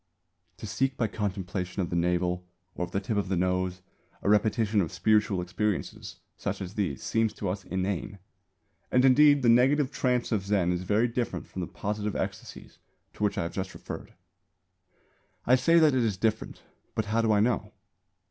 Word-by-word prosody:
To -, -, -8 dB
seek 135 Hz, +6 st, -1 dB
by 115 Hz, -, +1 dB
contemplation 100 Hz, -3 st, -3 dB
of 85 Hz, -, -5 dB
the -, -, -1 dB
navel 90 Hz, +1 st, 0 dB, 0.3 s
or 90 Hz, -, -3 dB
of 90 Hz, -, -15 dB
the 95 Hz, -, 0 dB
tip 105 Hz, +2 st, -3 dB
of 100 Hz, -2 st, -1 dB
the 95 Hz, -, +1 dB
nose 90 Hz, 0 st, -1 dB, 0.4 s
a -, -, +1 dB
repetition 105 Hz, 0 st, +3 dB
of 85 Hz, -, -2 dB
spiritual 100 Hz, +1 st, +2 dB
experiences 95 Hz, +2 st, -3 dB, 0.2 s
such -, -, -3 dB
as 95 Hz, -1 st, -6 dB
these 95 Hz, -11 st, -2 dB
seems 115 Hz, -1 st, +1 dB
to 100 Hz, -, -5 dB
us 95 Hz, +1 st, -3 dB
inane; 95 Hz, +1 st, -3 dB, 0.7 s
and 125 Hz, +1 st, +4 dB
indeed 145 Hz, +1 st, +6 dB
the -, -, +3 dB
negative 130 Hz, +4 st, +4 dB
trance 125 Hz, -3 st, 0 dB
of 105 Hz, -4 st, +1 dB
Zen 95 Hz, -3 st, +1 dB
is 90 Hz, 0 st, -1 dB
very 105 Hz, +6 st, +2 dB
different 120 Hz, 0 st, -3 dB
from -, -, -8 dB
the 85 Hz, -, -3 dB
positive 105 Hz, 0 st, -3 dB
ecstasies -, -, -6 dB, 0.3 s
to -, -, -5 dB
which 100 Hz, -1 st, +1 dB
I -, -, 0 dB
have 85 Hz, -, -5 dB
just 95 Hz, -1 st, -4 dB
referred. -, -, -8 dB, 1.3 s
I 125 Hz, -, +4 dB
say 150 Hz, +7 st, +5 dB
that 155 Hz, -3 st, +5 dB
it 130 Hz, -2 st, +2 dB
is 105 Hz, -4 st, 0 dB
different; 110 Hz, +2 st, -2 dB, 0.3 s
but 110 Hz, -, 0 dB
how 110 Hz, +2 st, +1 dB
do 110 Hz, -1 st, +2 dB
I 105 Hz, -, +4 dB
know? 105 Hz, -2 st, +1 dB
105 Hz, 185 wpm, -28 LUFS, 95-115 Hz, 1.3 s, indeed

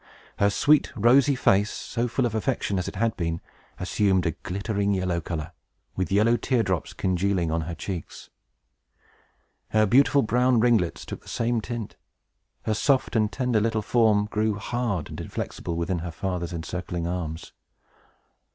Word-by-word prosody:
Her 100 Hz, -, +4 dB
sweet, 145 Hz, +8 st, +3 dB
rosy 130 Hz, +6 st, +5 dB
face, 100 Hz, -4 st, +3 dB
so 120 Hz, 0 st, -3 dB
full 125 Hz, +2 st, 0 dB
of 115 Hz, -, -1 dB
affection 110 Hz, -4 st, -1 dB
as 90 Hz, -, -3 dB
it -, -, -6 dB
had 115 Hz, +3 st, 0 dB
been, 85 Hz, -1 st, -2 dB, 0.4 s
assumed 95 Hz, -1 st, +1 dB
a 85 Hz, -, +2 dB
glittering 100 Hz, +4 st, -2 dB
yellow 90 Hz, -2 st, -1 dB
color, 80 Hz, 0 st, -5 dB, 0.4 s
with 95 Hz, -2 st, -2 dB
yellow 110 Hz, +4 st, +4 dB
tear 125 Hz, -2 st, +1 dB
drops 95 Hz, -4 st, -2 dB
congealing 95 Hz, -2 st, 0 dB
on 80 Hz, +1 st, 0 dB
her 85 Hz, +2 st, -5 dB
cheeks. 90 Hz, -4 st, -7 dB, 1.4 s
Her 110 Hz, 0 st, +3 dB
beautiful 140 Hz, +5 st, +4 dB
brown 125 Hz, +2 st, +3 dB
ringlets 100 Hz, -, +2 dB
took -, -, -7 dB
the -, -, -14 dB
same 115 Hz, 0 st, 0 dB
tint. 115 Hz, -1 st, -6 dB, 0.7 s
Her 110 Hz, -, 0 dB
soft 130 Hz, +3 st, +1 dB
and 110 Hz, -1 st, +2 dB
tender 125 Hz, -4 st, +1 dB
little 110 Hz, -1 st, 0 dB
form 110 Hz, -3 st, +3 dB
grew 105 Hz, 0 st, 0 dB
hard 105 Hz, -5 st, -2 dB
and -, -, -7 dB
inflexible 85 Hz, -, -5 dB
within 85 Hz, +1 st, -1 dB
her 85 Hz, +2 st, -5 dB
father's 90 Hz, 0 st, -3 dB
encircling 85 Hz, 0 st, -4 dB
arms. 85 Hz, -2 st, -4 dB
100 Hz, 155 wpm, -25 LUFS, 90-115 Hz, 1.4 s, rosy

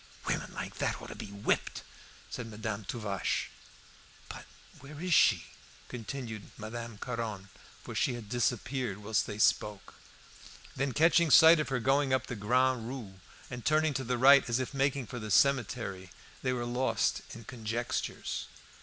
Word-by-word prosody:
"Women -, -, -2 dB
like -, -, -6 dB
that -, -, -1 dB
ought -, -, -10 dB
to -, -, -7 dB
be -, -, -7 dB
whipped," 100 Hz, +1 st, -1 dB, 0.5 s
said 125 Hz, -2 st, -5 dB
Madame 110 Hz, -1 st, -5 dB
Tuvache. 105 Hz, -3 st, -2 dB, 0.8 s
"But -, -, -8 dB, 0.3 s
where 145 Hz, +2 st, -11 dB
is 180 Hz, +1 st, 0 dB
she?" -, -, +5 dB, 0.5 s
continued 115 Hz, -2 st, -6 dB
Madame 115 Hz, 0 st, -6 dB
Caron, 110 Hz, -4 st, -4 dB, 0.3 s
for -, -, -7 dB
she 125 Hz, -, +1 dB
had 115 Hz, -3 st, -8 dB
disappeared 120 Hz, -1 st, -1 dB
whilst 105 Hz, +1 st, 0 dB
they 105 Hz, -, -5 dB
spoke; 105 Hz, -1 st, +1 dB, 0.8 s
then 135 Hz, 0 st, -1 dB
catching 165 Hz, +2 st, +4 dB
sight 160 Hz, +2 st, +8 dB
of 155 Hz, -, -1 dB
her 135 Hz, -2 st, 0 dB
going 135 Hz, +2 st, +2 dB
up 130 Hz, 0 st, -2 dB
the 125 Hz, -, -5 dB
Grande 125 Hz, +2 st, +1 dB
Rue, 115 Hz, -8 st, -7 dB, 0.3 s
and 125 Hz, -2 st, -6 dB
turning 155 Hz, 0 st, +2 dB
to 135 Hz, -, -2 dB
the 125 Hz, 0 st, -1 dB
right 140 Hz, +2 st, +7 dB
as 115 Hz, -, +2 dB
if 130 Hz, +2 st, -3 dB
making 135 Hz, -1 st, 0 dB
for 120 Hz, +2 st, -7 dB
the 110 Hz, -1 st, -6 dB
cemetery, 115 Hz, -7 st, +1 dB, 0.3 s
they 130 Hz, -, 0 dB
were 120 Hz, -1 st, -2 dB
lost 125 Hz, +2 st, 0 dB
in 115 Hz, -, -10 dB
conjectures. 115 Hz, +1 st, -3 dB
120 Hz, 160 wpm, -31 LUFS, 110-135 Hz, 0.8 s, sight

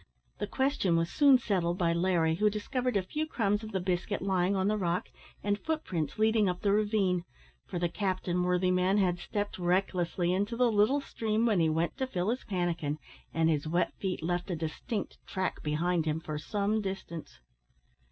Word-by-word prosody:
The -, -, -2 dB
question 265 Hz, -10 st, +1 dB
was 165 Hz, 0 st, 0 dB
soon 280 Hz, -3 st, +6 dB
settled 180 Hz, -7 st, 0 dB
by 170 Hz, -3 st, +2 dB
Larry, 170 Hz, -2 st, +2 dB
who 210 Hz, +6 st, +3 dB
discovered 245 Hz, +3 st, -1 dB
a 190 Hz, -, 0 dB
few 305 Hz, +11 st, -3 dB
crumbs 210 Hz, -7 st, 0 dB
of 220 Hz, -, -7 dB
the 190 Hz, -, -1 dB
biscuit 185 Hz, +2 st, -1 dB
lying 190 Hz, 0 st, +1 dB
on 190 Hz, 0 st, +1 dB
the 210 Hz, -, +2 dB
rock, 180 Hz, -3 st, -1 dB, 0.3 s
and 205 Hz, 0 st, 0 dB
footprints 180 Hz, -, -2 dB
leading 220 Hz, -2 st, +3 dB
up 180 Hz, 0 st, -3 dB
the 200 Hz, -, +2 dB
ravine; 205 Hz, -4 st, +2 dB, 0.4 s
for -, -, -4 dB
the 175 Hz, 0 st, +1 dB
captain, 185 Hz, -1 st, -1 dB
worthy 180 Hz, +1 st, +2 dB
man, 185 Hz, +2 st, +3 dB
had 180 Hz, -3 st, +2 dB
stepped 205 Hz, 0 st, -3 dB
recklessly 180 Hz, -1 st, +1 dB
into 205 Hz, +5 st, -1 dB
the 245 Hz, -1 st, +4 dB
little 220 Hz, +7 st, +3 dB
stream 225 Hz, -3 st, -1 dB
when 215 Hz, -6 st, +3 dB
he 160 Hz, -1 st, +3 dB
went 165 Hz, +6 st, 0 dB
to 260 Hz, -1 st, -1 dB
fill 190 Hz, -3 st, -1 dB
his 250 Hz, -, -3 dB
pannikin, 170 Hz, -6 st, -1 dB, 0.3 s
and 165 Hz, 0 st, +2 dB
his 150 Hz, 0 st, -1 dB
wet 175 Hz, +2 st, +1 dB
feet 185 Hz, -4 st, -2 dB
left 175 Hz, +3 st, -1 dB
a 175 Hz, -, -1 dB
distinct 165 Hz, +6 st, -4 dB
track 185 Hz, -1 st, -2 dB
behind 160 Hz, +2 st, 0 dB
him 155 Hz, +1 st, 0 dB
for 155 Hz, -2 st, -5 dB
some 205 Hz, +5 st, 0 dB
distance. 190 Hz, -5 st, -6 dB
185 Hz, 190 wpm, -30 LUFS, 175-210 Hz, 0.4 s, soon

